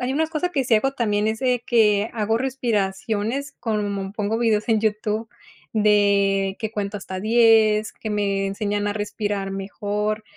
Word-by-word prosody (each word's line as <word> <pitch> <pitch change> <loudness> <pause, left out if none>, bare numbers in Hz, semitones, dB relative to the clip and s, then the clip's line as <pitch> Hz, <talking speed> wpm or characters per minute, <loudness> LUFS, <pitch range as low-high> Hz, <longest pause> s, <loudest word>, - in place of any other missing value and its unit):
hay 250 +1 -1
unas 315 +3 0
cosa 330 +2 -1
que 280 -6 0
sí 235 - +3
hago 270 +5 +2
también 210 -5 0
es 220 0 -2
de 250 -2 0
que 215 -2 +3
hago 225 -1 0
respiraciones 230 +1 -2
como 205 -3 -2
pongo 210 +1 -1
vídeos 220 -2 +1
en 220 -2 +3
YouTube 215 +1 -1 0.5
de 200 -2 +3
que 220 -2 -3
cuenta 205 -1 -3
hasta 190 -1 -6
10, 220 0 +4
que 220 - -6
me 200 -1 0
enseñan 205 +1 -2
a 205 - 0
respirar 205 -1 -3
mejor, 205 +2 -3
210 Hz, 160 wpm, -23 LUFS, 205-230 Hz, 0.5 s, 10